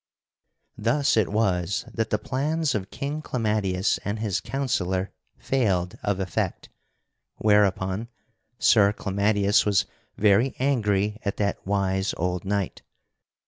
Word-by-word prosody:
Thus 135 Hz, +7 st, +2 dB
it 110 Hz, -4 st, +2 dB
was 95 Hz, -4 st, 0 dB
that 110 Hz, -1 st, -1 dB
the 105 Hz, -, +1 dB
plans 145 Hz, +7 st, -1 dB
of 95 Hz, -3 st, -3 dB
King 145 Hz, +2 st, -4 dB
Clamadius 105 Hz, -8 st, 0 dB
and 100 Hz, +2 st, -2 dB
his 105 Hz, -4 st, -1 dB
counsellor 95 Hz, -9 st, -1 dB, 0.3 s
failed 95 Hz, -9 st, 0 dB
of 100 Hz, -2 st, -1 dB
effect, 95 Hz, -4 st, -2 dB, 0.7 s
whereupon 105 Hz, 0 st, +2 dB, 0.5 s
Sir 105 Hz, -4 st, +5 dB
Clamadius 100 Hz, 0 st, +2 dB
was 100 Hz, -3 st, +2 dB, 0.3 s
very 105 Hz, +5 st, +3 dB
angry 105 Hz, -6 st, +1 dB
at 100 Hz, -, -2 dB
that 100 Hz, -1 st, -1 dB
wise 95 Hz, -1 st, 0 dB
old 90 Hz, +1 st, -2 dB
knight. 100 Hz, -1 st, -2 dB
105 Hz, 115 wpm, -25 LUFS, 95-115 Hz, 0.7 s, Sir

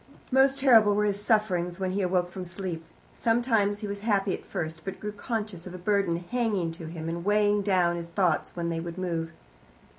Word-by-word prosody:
Most 270 Hz, +1 st, +4 dB
terrible 225 Hz, -7 st, +6 dB
were 210 Hz, 0 st, +2 dB
his 205 Hz, -1 st, -1 dB
sufferings 190 Hz, -5 st, +1 dB
when 190 Hz, -1 st, -1 dB
he 200 Hz, +2 st, -1 dB
awoke 180 Hz, -1 st, +1 dB
from 185 Hz, +1 st, -6 dB
sleep. 175 Hz, -2 st, -5 dB, 0.3 s
Sometimes 225 Hz, -3 st, +1 dB
he 210 Hz, -, -3 dB
was 200 Hz, 0 st, -4 dB
happy 200 Hz, -2 st, +1 dB
at -, -, -5 dB
first, 160 Hz, 0 st, -4 dB
but 195 Hz, -, -6 dB
grew 210 Hz, -, -4 dB
conscious 210 Hz, -4 st, -4 dB
of 180 Hz, -, -8 dB
a -, -, -5 dB
burden 195 Hz, -2 st, +1 dB
hanging 215 Hz, -9 st, 0 dB
to 165 Hz, -1 st, -8 dB
him 160 Hz, 0 st, -6 dB
and 170 Hz, +1 st, -3 dB
weighing 205 Hz, +1 st, +3 dB
down 180 Hz, -4 st, +2 dB
his 170 Hz, 0 st, -5 dB
thoughts 175 Hz, -2 st, +1 dB
when 170 Hz, -1 st, -2 dB
they 165 Hz, -1 st, -2 dB
would 170 Hz, +1 st, -6 dB
move. 165 Hz, -3 st, -2 dB
195 Hz, 205 wpm, -27 LUFS, 175-210 Hz, 0.3 s, terrible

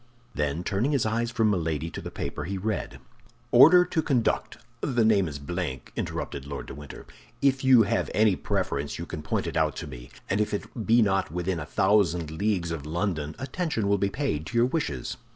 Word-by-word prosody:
Then 75 Hz, 0 st, -1 dB
turning 110 Hz, +10 st, 0 dB
his 135 Hz, -6 st, +2 dB
eyes 115 Hz, +2 st, 0 dB
from 115 Hz, -3 st, +2 dB
Milady 80 Hz, -3 st, -1 dB
to -, -, -6 dB
the -, -, -6 dB
paper, 75 Hz, -, -5 dB
he 95 Hz, +2 st, -3 dB
read: 100 Hz, -3 st, -3 dB, 0.5 s
"'Order 165 Hz, +9 st, +8 dB
to 165 Hz, -2 st, 0 dB
conduct—' 130 Hz, -7 st, 0 dB, 0.2 s
The 120 Hz, -5 st, +1 dB
name 100 Hz, -4 st, +4 dB
is 75 Hz, -2 st, -5 dB
blank," 70 Hz, -2 st, -4 dB
interrupted 70 Hz, -1 st, -4 dB
Lord 70 Hz, -1 st, -5 dB
de -, -, -8 dB
Winter. 75 Hz, +1 st, -10 dB, 0.3 s
"If 135 Hz, 0 st, +2 dB
you 130 Hz, -3 st, +7 dB
have 100 Hz, -, 0 dB
any 105 Hz, -2 st, +3 dB
preference 90 Hz, -8 st, -2 dB
you 85 Hz, -, -5 dB
can 80 Hz, -, -6 dB
point 75 Hz, -, -2 dB
it -, -, -4 dB
out 75 Hz, -4 st, +1 dB
to -, -, -5 dB
me; 60 Hz, -4 st, -10 dB, 0.2 s
and 100 Hz, +3 st, +1 dB
if 105 Hz, -, 0 dB
it 110 Hz, +2 st, -6 dB
be 115 Hz, +1 st, +6 dB
not 95 Hz, -2 st, +1 dB
within 90 Hz, +2 st, -2 dB
a 75 Hz, -, -6 dB
thousand 90 Hz, -6 st, +2 dB
leagues 90 Hz, 0 st, -1 dB
of 75 Hz, -3 st, -5 dB
London, 80 Hz, -3 st, -2 dB
attention 135 Hz, -, -2 dB
will 100 Hz, 0 st, +2 dB
be 100 Hz, -, +1 dB
paid 85 Hz, -, -2 dB
to 120 Hz, -, -3 dB
your 120 Hz, -, +5 dB
wishes. 125 Hz, -, -2 dB
95 Hz, 205 wpm, -27 LUFS, 80-115 Hz, 0.5 s, Order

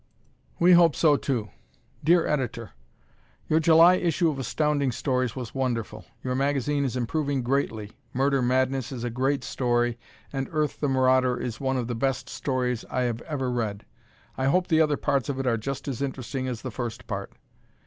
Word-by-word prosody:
We 175 Hz, +2 st, +5 dB
Hope 170 Hz, -3 st, +6 dB
So, 150 Hz, -3 st, +4 dB
Too! 120 Hz, -7 st, -2 dB, 0.5 s
Dear 170 Hz, +2 st, +4 dB
Editor: 125 Hz, -6 st, -2 dB, 0.8 s
Your 155 Hz, -, +3 dB
July 165 Hz, +3 st, +6 dB
issue 170 Hz, -1 st, +1 dB
of 140 Hz, -, -6 dB
Astounding 145 Hz, +1 st, 0 dB
Stories 125 Hz, -1 st, -1 dB
was 125 Hz, -4 st, -6 dB
wonderful. 115 Hz, -5 st, -3 dB, 0.2 s
Your 125 Hz, -, -1 dB
magazine 140 Hz, +1 st, 0 dB
is 130 Hz, -1 st, -2 dB
improving 140 Hz, +2 st, -1 dB
greatly. 115 Hz, -5 st, -1 dB, 0.2 s
"Murder 135 Hz, +1 st, +1 dB
Madness" 130 Hz, +1 st, +1 dB
is 125 Hz, -3 st, -5 dB
a 120 Hz, -, -2 dB
great 135 Hz, +4 st, 0 dB
story, 120 Hz, -1 st, 0 dB, 0.3 s
and 135 Hz, -1 st, -3 dB
"Earth, 155 Hz, -2 st, -1 dB
the 145 Hz, -, 0 dB
Marauder," 130 Hz, -1 st, +3 dB
is 120 Hz, 0 st, -5 dB
one 135 Hz, -1 st, 0 dB
of 125 Hz, -, -1 dB
the 120 Hz, -, -3 dB
best 135 Hz, +2 st, -1 dB
stories 125 Hz, -3 st, -2 dB
I 130 Hz, -, -1 dB
have 120 Hz, -2 st, -1 dB
ever 135 Hz, -4 st, -1 dB
read. 110 Hz, -4 st, -3 dB, 0.5 s
I 130 Hz, -, +1 dB
hope 180 Hz, +7 st, +2 dB
the 160 Hz, -2 st, +4 dB
other 150 Hz, -2 st, +2 dB
parts 140 Hz, -3 st, 0 dB
of 140 Hz, -, -2 dB
it 135 Hz, -, -2 dB
are 120 Hz, -2 st, +2 dB
just 130 Hz, +6 st, -5 dB
as 135 Hz, -2 st, -3 dB
interesting 130 Hz, -1 st, -3 dB
as 120 Hz, -3 st, -5 dB
the 130 Hz, -, -4 dB
first 120 Hz, -1 st, -5 dB
part. -, -, -5 dB
130 Hz, 180 wpm, -26 LUFS, 120-145 Hz, 0.8 s, Hope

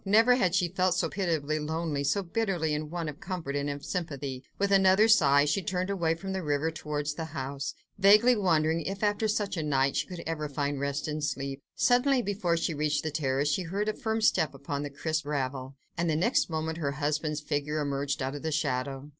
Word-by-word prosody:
Never 225 Hz, +5 st, +5 dB
had 185 Hz, -8 st, +2 dB
she 180 Hz, -1 st, +2 dB
felt 185 Hz, 0 st, +1 dB
so 170 Hz, -2 st, 0 dB
pitiably 155 Hz, -6 st, -1 dB
lonely, 155 Hz, -1 st, -2 dB
so 200 Hz, +8 st, +1 dB
bitterly 175 Hz, -5 st, -1 dB
in 150 Hz, 0 st, -3 dB
want 170 Hz, -1 st, -3 dB
of 150 Hz, -1 st, -6 dB
comfort 170 Hz, -7 st, -4 dB
and 145 Hz, 0 st, -1 dB
of 145 Hz, 0 st, -5 dB
sympathy. 140 Hz, -7 st, -4 dB
With 200 Hz, 0 st, 0 dB
another 190 Hz, +2 st, +5 dB
sigh 145 Hz, -9 st, +5 dB
she 165 Hz, +7 st, +1 dB
turned 185 Hz, 0 st, -2 dB
away 170 Hz, -4 st, +1 dB
from 190 Hz, +3 st, -5 dB
the 190 Hz, -, -2 dB
river 150 Hz, 0 st, 0 dB
towards 150 Hz, -2 st, -3 dB
the 160 Hz, +1 st, -5 dB
house, 140 Hz, -2 st, -5 dB, 0.2 s
vaguely 210 Hz, +6 st, +6 dB
wondering 165 Hz, -5 st, +2 dB
if, 195 Hz, +5 st, -4 dB
after 210 Hz, +1 st, +1 dB
such 205 Hz, -3 st, -1 dB
a -, -, 0 dB
night, 140 Hz, -2 st, +1 dB
she -, -, 0 dB
could 180 Hz, -2 st, -7 dB
ever 155 Hz, -2 st, -3 dB
find 145 Hz, 0 st, -2 dB
rest 140 Hz, +2 st, -2 dB
and 150 Hz, 0 st, -3 dB
sleep. 140 Hz, -1 st, -3 dB
Suddenly, 250 Hz, +1 st, +3 dB
before 190 Hz, -5 st, 0 dB
she 165 Hz, 0 st, -1 dB
reached 150 Hz, 0 st, 0 dB
the 155 Hz, -, -2 dB
terrace, 140 Hz, -1 st, 0 dB
she 195 Hz, -, 0 dB
heard 195 Hz, +5 st, -2 dB
a 215 Hz, -, +1 dB
firm 220 Hz, +1 st, -2 dB
step 155 Hz, -9 st, +2 dB
upon 140 Hz, +1 st, -4 dB
the 145 Hz, -, -4 dB
crisp 155 Hz, +3 st, -2 dB
gravel, 135 Hz, -2 st, -3 dB, 0.2 s
and 170 Hz, -1 st, 0 dB
the 155 Hz, -, +1 dB
next 200 Hz, +8 st, +2 dB
moment 160 Hz, 0 st, -3 dB
her 140 Hz, -3 st, -1 dB
husband's 150 Hz, +1 st, -1 dB
figure 150 Hz, 0 st, -2 dB
emerged 140 Hz, -1 st, -1 dB
out 135 Hz, +1 st, -2 dB
of 145 Hz, -, -6 dB
the 160 Hz, -, -2 dB
shadow. 140 Hz, -2 st, -2 dB
155 Hz, 215 wpm, -29 LUFS, 145-185 Hz, 0.2 s, vaguely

